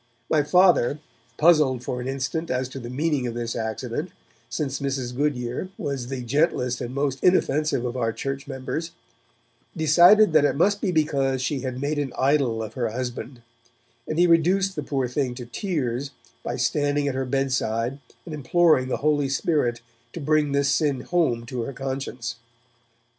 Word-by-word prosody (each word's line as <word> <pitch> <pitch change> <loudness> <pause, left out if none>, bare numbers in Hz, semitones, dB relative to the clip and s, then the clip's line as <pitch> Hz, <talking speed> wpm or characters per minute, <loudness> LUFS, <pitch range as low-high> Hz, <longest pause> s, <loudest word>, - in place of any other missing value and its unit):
My 155 - +4
Father, 175 -3 +4 0.4
puzzled 150 -6 +4
for 125 0 -3
an 125 - -5
instant 135 +5 -3
as 130 0 -1
to 135 - -7
the 120 -1 -7
meaning 140 0 0
of 120 - -5
this 120 -1 -3
accident, 110 -2 -3 0.4
since 135 -3 -2
Mrs. 135 -3 -3
Goodyer 130 +2 -2
was 135 -4 -3
the 130 -1 -4
gentlest 125 -2 0
and 125 +2 -5
most 140 -2 -1
inoffensive 150 -7 +2
of 125 0 -3
our 115 -3 0
church 135 +4 -5
members, 150 +5 -4 0.8
decided 175 +5 +6
that 155 -2 +6
it 145 - +2
must 200 +7 +2
be 195 - 0
because 140 -5 +1
she 140 +1 -1
had 130 -1 -4
made 145 +2 -1
an 140 -3 -3
idol 130 -5 +2
of 110 0 -7
her 120 -2 -1
husband, 125 +1 -5 0.6
and 155 - -3
he 175 - +5
reduced 180 +3 +3
the 150 - -2
poor 135 -3 -1
thing 125 0 -2
to 120 -1 -7
tears 135 - -2 0.3
by - - -4
standing 145 0 0
at 140 - 0
her 135 0 -1
bed 135 +1 0
side 120 +2 -1 0.3
and 165 - -7
imploring 150 -1 +3
the - - -1
Holy 145 -2 +2
Spirit 135 -4 0 0.3
to - - -6
bring 150 -1 +1
this 140 0 +2
sin 140 -2 +1
home 140 -10 0
to 120 0 -4
her 125 +4 -4
conscience. 130 -3 -4
135 Hz, 175 wpm, -24 LUFS, 125-155 Hz, 0.8 s, decided